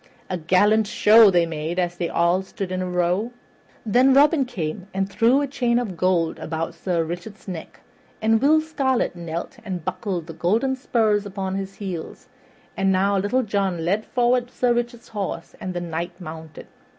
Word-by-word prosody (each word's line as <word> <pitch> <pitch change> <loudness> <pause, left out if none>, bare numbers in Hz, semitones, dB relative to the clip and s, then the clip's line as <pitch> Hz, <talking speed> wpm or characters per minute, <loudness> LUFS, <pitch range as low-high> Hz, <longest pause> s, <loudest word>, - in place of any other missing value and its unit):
A 185 - -1
gallant 205 +6 +3
show 215 0 +6
they 175 -3 +3
made 160 +1 -4
as 175 -1 0
they 175 -1 -2
stood - - -7
all 170 +2 +3 0.2
in 185 -1 -2
a 185 - -3
row. 180 +5 0 0.6
Then 255 +5 +4
Robin 285 0 +5
came 185 -4 -5
and 195 0 0
threw 235 +7 +3
a 285 - -1
chain 245 -3 0
of 225 -7 -2
gold 170 -2 +1
about 160 +1 -3
Sir 170 0 -1
Richard's 175 +7 -7
neck, 175 -4 -8 0.4
and 220 0 +2
Will 310 +3 +5
Scarlet 270 - 0
knelt 170 -1 -6
and 185 -5 -5
buckled 185 -2 -3
the 165 - -8
golden 225 +12 +1
spurs 215 -5 +1
upon 190 -1 -4
his 195 0 -4
heel; 185 -5 -5 0.6
and 195 0 +2
now 195 +2 +2
Little 205 +7 +1
John 195 -6 -1
led 200 +5 +1
forward 245 0 +1
Sir 245 -1 +1
Richard's 240 0 -3
horse, 195 -5 -5
and 185 -1 -4
the 175 - -2
Knight 170 +1 -5
mounted. 160 -3 -9
195 Hz, 175 wpm, -23 LUFS, 175-230 Hz, 0.6 s, show